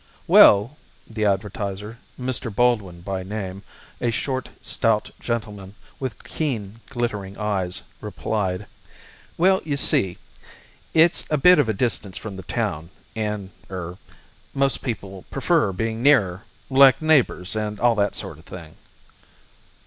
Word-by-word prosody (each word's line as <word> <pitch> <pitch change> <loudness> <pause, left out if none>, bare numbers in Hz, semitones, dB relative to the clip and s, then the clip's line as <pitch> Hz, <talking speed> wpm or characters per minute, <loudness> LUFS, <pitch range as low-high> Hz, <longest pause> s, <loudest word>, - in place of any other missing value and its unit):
"Well," 105 +9 +6 0.3
the 110 -2 -2
advertiser 100 +2 -2 0.2
Mr. 125 -1 -2
Baldwin 100 -6 +1
by 95 +1 -3
name, 95 -1 -5 0.4
a 120 - +1
short, 130 +3 -2
stout 110 -2 0
gentleman, 105 -4 -4 0.2
with 130 -6 -5
keen, 115 -9 -4
glittering 105 -7 -3
eyes 95 -4 -2 0.2
replied, 105 -2 -2 0.7
"Well, 190 +2 +4
you 145 -3 -2
see, 95 -9 +3 0.8
it's 165 +1 +4
a 150 - +2
bit 180 +3 +6
of 135 -6 +2
a - - +2
distance 95 -4 -1
from 105 -3 -7
the 95 - -7
town, 80 -3 -3 0.3
and 105 -3 -3 0.2
er 90 -1 -6 0.6
most 135 -1 +1
people 100 -6 -5
prefer - - +1
being 115 +4 -3
nearer 105 -9 +3 0.3
like 135 0 +7
neighbours 140 - +2
and 105 -1 -3
all 120 -1 +4
that 100 -2 0
sort - - -5
of 80 - -18
thing." 80 -4 -11
105 Hz, 130 wpm, -23 LUFS, 95-125 Hz, 0.8 s, like